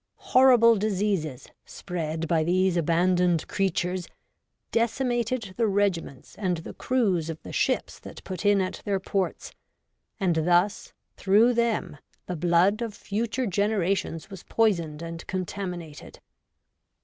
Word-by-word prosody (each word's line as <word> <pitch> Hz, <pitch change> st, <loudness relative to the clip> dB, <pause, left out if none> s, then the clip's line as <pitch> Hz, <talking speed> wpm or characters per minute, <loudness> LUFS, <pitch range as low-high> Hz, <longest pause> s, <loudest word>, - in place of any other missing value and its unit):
Horrible 245 Hz, -3 st, +6 dB
diseases, 195 Hz, -, -1 dB, 0.2 s
spread 165 Hz, -2 st, -4 dB
by 160 Hz, -1 st, +2 dB
these 185 Hz, +2 st, +2 dB
abandoned 175 Hz, +1 st, +2 dB
54 -, -, -19 dB
REVOLTED -, -, -17 dB
WOMAN. -, -, -9 dB, 0.5 s
creatures, 175 Hz, -, -15 dB, 0.6 s
decimated 235 Hz, -2 st, -1 dB
the 230 Hz, -2 st, +2 dB
regiments 195 Hz, -9 st, -1 dB
and 185 Hz, -4 st, 0 dB
the 165 Hz, -, -8 dB
crews 195 Hz, -11 st, 0 dB
of 160 Hz, -1 st, -5 dB
the -, -, -9 dB
ships -, -, -1 dB
that -, -, -11 dB
put 185 Hz, +1 st, -6 dB
in 205 Hz, -1 st, +4 dB
at 185 Hz, -, -4 dB
their 200 Hz, -2 st, 0 dB
ports; 190 Hz, 0 st, -3 dB, 0.7 s
and 180 Hz, -5 st, +1 dB
thus, 175 Hz, +5 st, +1 dB, 0.3 s
through 215 Hz, +5 st, +4 dB
them, 235 Hz, -10 st, -1 dB, 0.3 s
the 180 Hz, -, -4 dB
blood 175 Hz, +6 st, +2 dB
of 225 Hz, -3 st, -4 dB
future 230 Hz, +5 st, -2 dB
generations 195 Hz, -3 st, -1 dB
was 190 Hz, -3 st, -8 dB
poisoned 170 Hz, -8 st, 0 dB
and 165 Hz, 0 st, -7 dB
contaminated. 180 Hz, -4 st, -6 dB
190 Hz, 135 wpm, -26 LUFS, 170-215 Hz, 0.7 s, Horrible